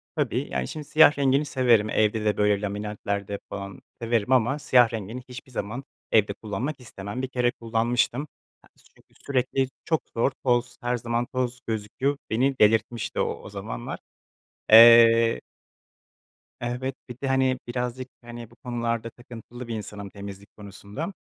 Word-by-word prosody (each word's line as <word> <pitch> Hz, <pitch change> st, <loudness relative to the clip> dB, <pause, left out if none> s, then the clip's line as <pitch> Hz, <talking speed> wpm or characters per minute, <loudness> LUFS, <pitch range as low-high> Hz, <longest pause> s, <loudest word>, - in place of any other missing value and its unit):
Tabii. -, -, -1 dB
Yani, 65 Hz, -1 st, -1 dB
şimdi, 155 Hz, -, -6 dB
siyah 155 Hz, 0 st, +6 dB
rengini 140 Hz, +1 st, +2 dB
severim 120 Hz, -7 st, +3 dB
evde 110 Hz, 0 st, +1 dB
de, 105 Hz, -, +1 dB
böyle, 105 Hz, -1 st, +2 dB
laminantlarda 100 Hz, -1 st, -3 dB
falan 100 Hz, -1 st, -7 dB, 0.2 s
severim 115 Hz, 0 st, 0 dB
ama 130 Hz, +3 st, +3 dB
siyah 125 Hz, -4 st, +4 dB
rengini 110 Hz, +3 st, -5 dB
hiçbir 130 Hz, +1 st, -10 dB
zaman 120 Hz, +3 st, -4 dB, 0.3 s
evde 105 Hz, -2 st, +3 dB
kullanmak 110 Hz, +8 st, -4 dB
istemem. 110 Hz, -1 st, -7 dB
Bir 130 Hz, -, -2 dB
kere 125 Hz, -1 st, +1 dB
kullanmıştım. 120 Hz, +3 st, 0 dB, 0.4 s
Ya, -, -, -22 dB, 0.3 s
çünkü -, -, -26 dB
sürekli 130 Hz, 0 st, 0 dB, 0.2 s
çok 160 Hz, -2 st, +1 dB
zor, 115 Hz, +4 st, +2 dB
toz 125 Hz, -1 st, +1 dB
her 120 Hz, 0 st, 0 dB
zaman 120 Hz, +1 st, -1 dB
toz 125 Hz, 0 st, -3 dB
gözüküyor. 115 Hz, +6 st, -2 dB
Beni 130 Hz, +4 st, +1 dB
delirtmişti 115 Hz, +2 st, +2 dB
o -, -, -1 dB
o -, -, -9 dB
zamanlar. -, -, -6 dB, 0.7 s
Eee 115 Hz, 0 st, +8 dB, 1.2 s
Evet, 125 Hz, +2 st, -3 dB
bir 120 Hz, -, -8 dB
de, 140 Hz, -, -2 dB
hani, 130 Hz, -1 st, +2 dB
birazcık, 125 Hz, +1 st, -3 dB
hani, 120 Hz, -1 st, -10 dB
bu -, -, -18 dB
konularda 115 Hz, -2 st, -3 dB
takıntılı 120 Hz, +1 st, -11 dB
bir 115 Hz, -, -3 dB
insanım, 105 Hz, -2 st, -7 dB
temizlik 100 Hz, 0 st, -10 dB
konusunda. 105 Hz, -, -7 dB
120 Hz, 145 wpm, -25 LUFS, 105-130 Hz, 1.2 s, Eee